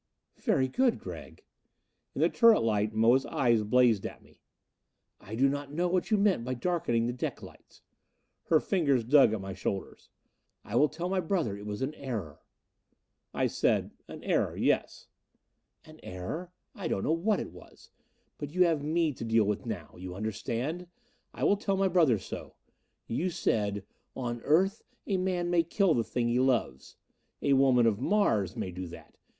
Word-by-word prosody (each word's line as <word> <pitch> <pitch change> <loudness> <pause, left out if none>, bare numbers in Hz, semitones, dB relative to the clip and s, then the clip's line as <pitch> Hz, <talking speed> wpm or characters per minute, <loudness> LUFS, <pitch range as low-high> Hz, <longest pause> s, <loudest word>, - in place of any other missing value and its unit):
"Very 130 - +2
good, 245 - +2
Gregg." - - -10 0.7
In - - -2
the - - +4
turret 230 -2 +5
light 105 -1 +1
Moa's 115 +4 +3
eyes 120 -4 +2
blazed 115 -1 +3
at - - -7
me. - - -24 0.8
"I 110 - -8
do 135 +4 +4
not 140 0 -3
know 175 +4 0
what 180 0 0
you 215 - +3
meant 200 - +2
by 130 +1 -3
darkening 120 -6 0
the 120 - -1
deck 125 - -4
lights." - - -15 0.6
Her 160 - +4
fingers 145 - +1
dug 135 -1 +5
at 110 - -2
my 95 0 -6
shoulders. 95 +1 -5 0.6
"I 105 - -5
will 150 +4 +4
tell 170 +3 -4
my 190 +1 0
brother 165 - -1
it 100 +1 -9
was 105 +4 -3
an 140 +3 -2
error." 110 - -6 0.9
I - - 0
said, - - +1 0.2
"An - - -10
error - - 0
yes." - - 0 0.8
"An - - -15
error? 120 - -6 0.2
I 190 -5 -5
don't 95 - -1
know - - +1
what 195 +5 +1
it - - -6
was. - - -16 0.5
But 145 +3 -6
you 185 - +5
have 165 -4 +1
me 160 0 +1
to 120 - -8
deal 115 -1 +3
with 105 0 -2
now. - - -5
You 90 0 -7
understand? 115 - -3 0.4
I - - -6
will 200 - +4
tell 195 -1 -1
my 195 0 +3
brother 165 -10 +4
so. 95 - -8 0.5
You 165 +11 -1
said, 105 - -1 0.3
'On 120 -2 -4
Earth 190 - +2 0.2
a 195 - 0
man 180 -1 -1
may 175 -1 +4
kill 170 +2 +2
the 115 - +1
thing 120 +1 -2
he 120 +1 +1
loves.' 125 - 0 0.5
A 140 - +3
woman 130 -3 +4
of 110 -2 +2
Mars 135 - +1
may 90 - -4
do 90 0 -6
that! 85 - -13
130 Hz, 180 wpm, -29 LUFS, 110-175 Hz, 0.9 s, turret